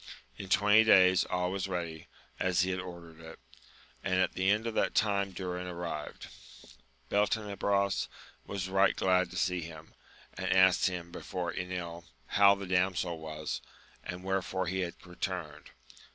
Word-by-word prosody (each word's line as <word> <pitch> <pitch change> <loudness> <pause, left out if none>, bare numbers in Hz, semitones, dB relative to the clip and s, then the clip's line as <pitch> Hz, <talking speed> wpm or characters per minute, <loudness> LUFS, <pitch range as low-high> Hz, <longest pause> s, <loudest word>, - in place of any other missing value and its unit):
In 95 - -8
twenty 105 +3 +5
days 95 -4 +6
all 90 0 -1
was 95 0 -2
ready, 85 -4 -4 0.3
as 90 -2 +2
he 95 +1 +1
had 90 - -2
ordered 85 -3 -9
it, 80 0 -11 0.7
and 95 -1 0
at 95 0 +2
the 95 +1 +1
end 105 +2 +2
of 115 - -2
that - - 0
time 100 -2 +2
Durin 90 -1 -4
arrived. 85 -4 -5 0.8
Beltenebros 100 -1 +1 0.4
was 95 -2 -4
right 95 0 +3
glad 95 -1 +2
to - - -8
see 90 0 +1
him, 80 -1 -10 0.4
and - - -3
asked 95 0 +5
him 90 -2 -4
before 90 0 -4
Enil 85 -2 -5 0.2
how 100 0 +5
the 100 0 -6
damsel 90 -2 0
was, 80 -1 -5 0.4
and 90 +1 -6
wherefore 95 0 -1
he 95 +2 -2
had 90 -2 -2
returned. 90 -1 -5
90 Hz, 150 wpm, -31 LUFS, 90-95 Hz, 0.8 s, days